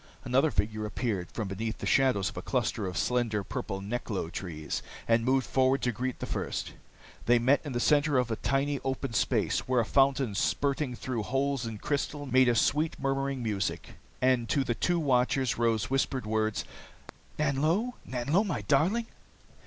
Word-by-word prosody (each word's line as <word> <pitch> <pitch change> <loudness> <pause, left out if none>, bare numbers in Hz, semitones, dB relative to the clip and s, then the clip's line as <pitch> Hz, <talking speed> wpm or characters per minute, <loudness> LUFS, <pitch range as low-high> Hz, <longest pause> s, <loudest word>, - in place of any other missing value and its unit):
Another 135 +5 +3
figure 110 -3 -1
appeared 105 -5 -2
from 110 -3 -3
beneath 110 +4 -3
the - - -6
shadows 130 -8 +3
of - - -13
a - - -3
cluster 105 -4 -1
of 90 - -4
slender, 115 -4 0
purple 95 +1 -4
neklo 100 -5 -3
trees 80 -5 -4 0.3
and 115 0 +3
moved 130 +1 +2
forward 130 +1 +2
to 125 - +2
greet 125 +3 -3
the - - -5
first. - - -3 0.5
They 120 +1 +6
met 130 +4 +3
in 145 -4 -5
the 120 - 0
center 145 +2 +3
of 125 -2 +1
a - - +1
tiny 140 +1 0
open 135 -1 -2
space, - - +1
where 130 -1 +2
a 115 - +2
fountain 135 -3 +2
spurting 140 +5 0
through 120 -2 -3
holes 135 +1 -1
in 110 -2 -5
crystal 145 +4 -2
made 130 -1 +4
a 120 - +2
sweet 150 +7 +1
murmuring 135 -1 -1
music. 105 -3 -2 0.3
And 125 -3 +2
to 140 - +2
the 120 - 0
two 175 +9 0
watchers 130 -3 +1
rose 115 -1 +1
whispered 135 -2 0
words 110 0 0 0.7
"Nanlo! 155 - +1
Nanlo, 140 - +1
my 170 - -2
darling!" 165 - +2
125 Hz, 175 wpm, -29 LUFS, 110-140 Hz, 0.7 s, They